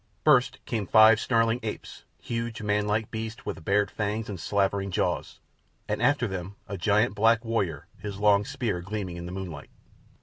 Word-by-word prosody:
First -, -, +4 dB
came 110 Hz, -5 st, -2 dB
five 110 Hz, +1 st, +7 dB
snarling 115 Hz, -1 st, +2 dB
apes, 110 Hz, -2 st, -7 dB
huge, 115 Hz, -1 st, -4 dB
manlike 105 Hz, +1 st, 0 dB
beasts, 110 Hz, 0 st, -5 dB
with -, -, -5 dB
bared 100 Hz, +3 st, +2 dB
fangs 105 Hz, +1 st, -2 dB
and 95 Hz, -4 st, -5 dB
slavering 100 Hz, +1 st, 0 dB
jaws; 90 Hz, -, -2 dB, 0.5 s
and -, -, -2 dB
after 145 Hz, -4 st, +3 dB
them 95 Hz, 0 st, -5 dB
a 100 Hz, -, -4 dB
giant 100 Hz, +4 st, +2 dB
black 115 Hz, +2 st, +3 dB
warrior, 100 Hz, -11 st, -1 dB
his 100 Hz, -2 st, -6 dB
long 105 Hz, 0 st, +4 dB
spear 115 Hz, -7 st, -3 dB
gleaming 95 Hz, -2 st, -5 dB
in 85 Hz, 0 st, -6 dB
the -, -, -7 dB
moonlight. 90 Hz, -6 st, -7 dB
105 Hz, 165 wpm, -27 LUFS, 95-115 Hz, 0.5 s, five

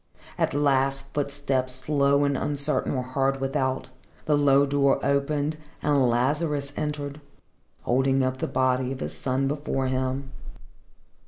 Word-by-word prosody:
At -, -, 0 dB
last 135 Hz, -1 st, +1 dB
footsteps, 140 Hz, -3 st, -1 dB
slow 140 Hz, +1 st, +2 dB
and 140 Hz, -1 st, +1 dB
uncertain, 140 Hz, 0 st, -1 dB
were 130 Hz, -, -1 dB
heard 135 Hz, +1 st, 0 dB
without, 135 Hz, -1 st, -1 dB, 0.4 s
the 150 Hz, -, +3 dB
low 140 Hz, -1 st, +4 dB
door 140 Hz, -1 st, +2 dB
opened, 145 Hz, +2 st, 0 dB, 0.3 s
and 140 Hz, -4 st, +3 dB
Lazarus 145 Hz, +4 st, 0 dB
entered, 150 Hz, -1 st, -4 dB, 0.6 s
holding 135 Hz, +1 st, +2 dB
up 130 Hz, 0 st, -1 dB
the -, -, -2 dB
body 130 Hz, 0 st, +1 dB
of 135 Hz, -, -5 dB
his -, -, -4 dB
son 135 Hz, +1 st, -1 dB
before 140 Hz, -2 st, -2 dB
him. 130 Hz, +1 st, -2 dB
135 Hz, 135 wpm, -26 LUFS, 130-145 Hz, 0.6 s, low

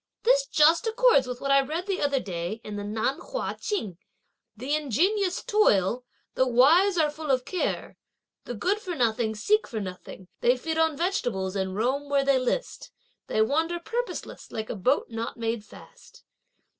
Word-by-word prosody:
This -, -, +3 dB
just 325 Hz, +5 st, +4 dB
accords 450 Hz, -, +4 dB
with 250 Hz, -1 st, -6 dB
what 275 Hz, -, -1 dB
I 275 Hz, 0 st, +6 dB
read 315 Hz, +6 st, -4 dB
the 390 Hz, -2 st, -2 dB
other 280 Hz, -2 st, +1 dB
day 180 Hz, +1 st, -4 dB
in 210 Hz, -, -7 dB
the 205 Hz, -, -4 dB
Nan 220 Hz, +6 st, -1 dB
Hua -, -, -4 dB
Ching. 210 Hz, -, -4 dB, 0.6 s
'The 260 Hz, +6 st, -3 dB
ingenious 355 Hz, -, +1 dB
toil, 245 Hz, -, +2 dB, 0.3 s
the 260 Hz, -, +2 dB
wise 325 Hz, +11 st, +5 dB
are 305 Hz, -2 st, +3 dB
full 310 Hz, 0 st, -7 dB
of 255 Hz, -2 st, +2 dB
care; 365 Hz, -, -3 dB, 0.5 s
the 245 Hz, -, -5 dB
good 385 Hz, -, 0 dB
for 370 Hz, -5 st, -5 dB
nothing 230 Hz, -4 st, 0 dB
seek 425 Hz, -, +1 dB
for 225 Hz, -, -4 dB
nothing, 185 Hz, -1 st, -8 dB
they 245 Hz, +2 st, +3 dB
feed 320 Hz, +5 st, -3 dB
on 320 Hz, -2 st, +2 dB
vegetables, 240 Hz, -, -1 dB
and 190 Hz, -1 st, -2 dB
roam 265 Hz, +7 st, -1 dB
where 280 Hz, -1 st, +2 dB
they 275 Hz, -1 st, +4 dB
list; 255 Hz, -, -3 dB, 0.4 s
they 220 Hz, -, +2 dB
wander 325 Hz, +8 st, 0 dB
purposeless 480 Hz, +7 st, -5 dB
like 220 Hz, 0 st, -4 dB
a -, -, -4 dB
boat 245 Hz, +6 st, 0 dB
not 225 Hz, +1 st, -4 dB
made 230 Hz, -1 st, -2 dB
fast!' -, -, -16 dB
275 Hz, 175 wpm, -26 LUFS, 220-345 Hz, 0.6 s, I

